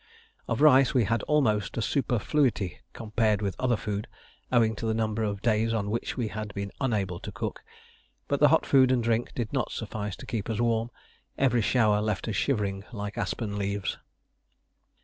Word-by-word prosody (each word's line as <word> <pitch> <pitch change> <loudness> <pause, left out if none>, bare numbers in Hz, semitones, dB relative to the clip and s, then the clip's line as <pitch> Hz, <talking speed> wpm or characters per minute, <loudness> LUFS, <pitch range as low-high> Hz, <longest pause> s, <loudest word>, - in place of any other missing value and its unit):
Of - - -1
rice 135 -4 +6
we 125 - +5
had 115 +1 0
almost 115 -11 +2
a - - 0
superfluity 125 - 0
compared 110 -1 0
with 100 -2 -1
other 125 -3 +2
food, 105 0 -4 0.4
owing 115 -3 +3
to 115 - -3
the 110 - +1
number 110 0 -1
of 100 -2 -2
days 115 0 +2
on 105 -2 -1
which 115 - -3
we 120 -4 -1
had 105 +1 -5
been 100 0 -4
unable 100 -9 -1
to 105 - -7
cook. 105 +1 -5 0.7
But - - 0
the - - +7
hot - - +3
food 130 -2 +5
and 125 -2 +2
drink 115 +1 0
did 115 -1 -3
not 130 -3 -1
suffice 105 -3 -4
to - - -11
keep 115 -2 -3
us 110 - -2
warm: 115 -1 +1 0.5
every 125 -3 +3
shower 105 -2 +3
left 105 -1 -2
us 110 - -2
shivering 100 -5 0
like 105 -2 -5
aspen 105 -3 -3
leaves. 100 0 -2
110 Hz, 185 wpm, -27 LUFS, 105-120 Hz, 0.7 s, the